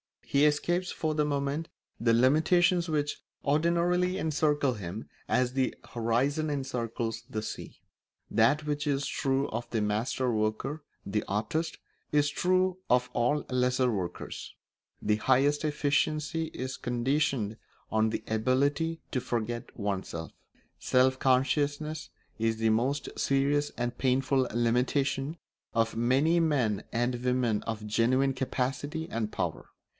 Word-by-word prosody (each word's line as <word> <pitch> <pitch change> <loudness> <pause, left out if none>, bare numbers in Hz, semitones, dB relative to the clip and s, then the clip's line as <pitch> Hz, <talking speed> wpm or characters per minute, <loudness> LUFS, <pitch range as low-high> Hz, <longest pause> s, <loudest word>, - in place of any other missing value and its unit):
He 140 +1 +3
escapes 175 +5 +1
for 155 -1 -1
the 150 -1 +1
moment 145 +2 -1 0.3
the 115 0 +3
limitations 170 +8 +4
which 150 -2 -1 0.2
ordinarily 170 +5 +2
encircle 150 -5 +1
him 100 +1 -6 0.2
as 125 0 +1
the 130 -1 0 0.2
horizon 130 +7 +1
encircles 120 -5 -3
the 110 -4 -3
sea. - - -7 0.5
That 145 +7 +3
which 150 0 -2
is 140 -1 +1
true 135 +1 0
of 120 +2 -4
the 115 - 0
master 110 +4 0
worker, 110 +8 -1 0.2
the 105 +2 -1
artist, 115 +12 -1 0.4
is 145 -1 +4
true 185 +3 +1
of 125 0 +3
all 140 +5 +1
lesser 125 0 +2
workers: 95 -5 -5 0.5
the 105 0 +2
highest 140 +6 +3
efficiency 150 +2 0
is 130 -4 -5
conditioned 125 -3 0 0.3
on 110 0 +3
the 110 - -3
ability 140 +9 +1
to 130 - 0
forget 120 -1 -3
oneself. 95 -6 -3 0.5
Self 130 +1 +3
consciousness 145 +4 +1 0.3
is 115 0 +1
the 115 0 +2
most 135 +6 0
serious 140 +2 +2
and 120 0 -2
painful 130 0 +2
limitation 135 +5 +1 0.4
of 115 0 +1
many 135 +8 +3
men 130 - +1
and 120 +1 -1
women 125 -4 +1
of 110 -1 -4
genuine 130 +5 +2
capacity 135 +5 -2
and 110 -2 -2
power. - - -3
130 Hz, 125 wpm, -29 LUFS, 115-150 Hz, 0.5 s, limitations